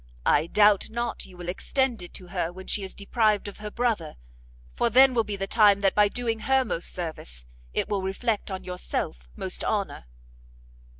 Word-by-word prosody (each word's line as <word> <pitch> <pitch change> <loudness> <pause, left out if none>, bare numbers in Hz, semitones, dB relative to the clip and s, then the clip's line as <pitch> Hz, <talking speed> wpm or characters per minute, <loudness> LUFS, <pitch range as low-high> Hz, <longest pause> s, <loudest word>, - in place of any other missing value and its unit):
I 150 +3 +3
doubt 205 +2 +4
not 235 +1 -3
you 185 - -15
will 175 -1 -8
extend 245 +5 0
it 175 - -9
to 180 -2 -7
her 175 -2 -2
when 185 +1 -10
she 210 - 0
is 190 - -6
deprived 210 0 +1
of 205 - -9
her 210 0 -5
brother, 220 -9 -1 0.6
for 235 - +2
then 260 +3 +7
will 230 -2 +3
be 210 -1 -4
the 195 0 -2
time 205 -1 +5
that 195 -1 +3
by 210 0 +5
doing 230 +1 -2
her 265 +3 +2
most 175 -6 -2
service, 60 - -5 0.3
it - - 0
will 200 -2 -1
reflect 205 +4 -1
on 190 -1 -5
yourself 60 - -4
most 185 - -3
honour." 200 - -2
200 Hz, 190 wpm, -26 LUFS, 180-225 Hz, 0.6 s, then